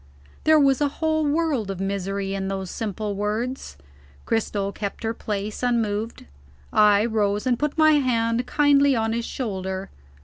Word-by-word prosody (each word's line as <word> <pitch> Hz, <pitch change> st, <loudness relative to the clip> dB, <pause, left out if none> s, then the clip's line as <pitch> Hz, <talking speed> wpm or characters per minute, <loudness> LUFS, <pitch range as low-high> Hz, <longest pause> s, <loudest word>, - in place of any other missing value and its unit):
There 315 Hz, 0 st, +6 dB
was 275 Hz, -1 st, +3 dB
a 290 Hz, -, +4 dB
whole 315 Hz, +1 st, 0 dB
world 290 Hz, -8 st, 0 dB
of 195 Hz, -2 st, -4 dB
misery 195 Hz, 0 st, -2 dB
in 195 Hz, -1 st, -3 dB
those 190 Hz, -1 st, -4 dB
simple 210 Hz, -1 st, -3 dB
words. 215 Hz, -, -3 dB, 0.5 s
Cristel 205 Hz, -3 st, -1 dB
kept 200 Hz, +2 st, -6 dB
her 225 Hz, 0 st, -1 dB
place, 210 Hz, -1 st, -4 dB
unmoved. 225 Hz, -3 st, -1 dB, 0.5 s
I 210 Hz, 0 st, +5 dB
rose, 210 Hz, -2 st, 0 dB
and 245 Hz, -2 st, +1 dB
put 295 Hz, +1 st, -1 dB
my 310 Hz, 0 st, +6 dB
hand 240 Hz, -4 st, +1 dB
kindly 285 Hz, -2 st, +4 dB
on 225 Hz, -1 st, 0 dB
his 230 Hz, 0 st, -2 dB
shoulder. 190 Hz, -5 st, -4 dB
225 Hz, 150 wpm, -24 LUFS, 200-270 Hz, 0.5 s, There